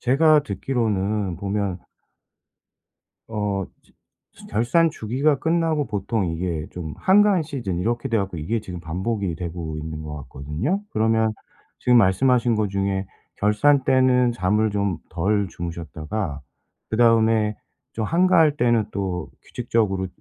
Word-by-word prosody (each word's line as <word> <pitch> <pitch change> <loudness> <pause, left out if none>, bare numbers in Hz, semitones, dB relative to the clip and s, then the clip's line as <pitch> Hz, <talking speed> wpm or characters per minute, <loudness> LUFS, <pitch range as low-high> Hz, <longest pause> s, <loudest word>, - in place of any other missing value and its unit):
제가 150 +4 +4
듣기로는 105 - -1
보면 100 -2 -2 1.5
어 105 -3 -2 0.7
저 - - -15
결산 120 +10 +2
주기가 135 +5 0
끝나고 160 -3 +1
보통 105 -1 -1
이게 80 -2 -3
좀 80 -4 -6
한가한 195 -2 +4
시즌 120 - -4
이렇게 120 +5 -1
돼 115 - +1
갖고 95 -3 -2
이게 105 +9 -2
지금 90 -4 -7
반복이 95 +3 -2
되고 85 -2 -5
있는 80 0 -6
것 75 -1 -6
같거든요? 80 - -3
그러면 110 0 +1 0.5
지금 125 -1 +5
말씀하신 120 +4 +3
거 105 -1 0
중에 95 0 -1 0.3
결산 130 +8 +3
때는 130 -1 +4
잠을 105 0 +1
좀 100 -4 -1
덜 100 +4 0
주무셨다가 85 -1 -5 0.5
그다음에 110 -2 +3 0.4
좀 110 - -2
한가할 165 - +4
때는 120 -4 +2
또 95 -4 -3
규칙적으로 105 -6 -1
105 Hz, 270 characters per minute, -23 LUFS, 90-125 Hz, 1.5 s, 지금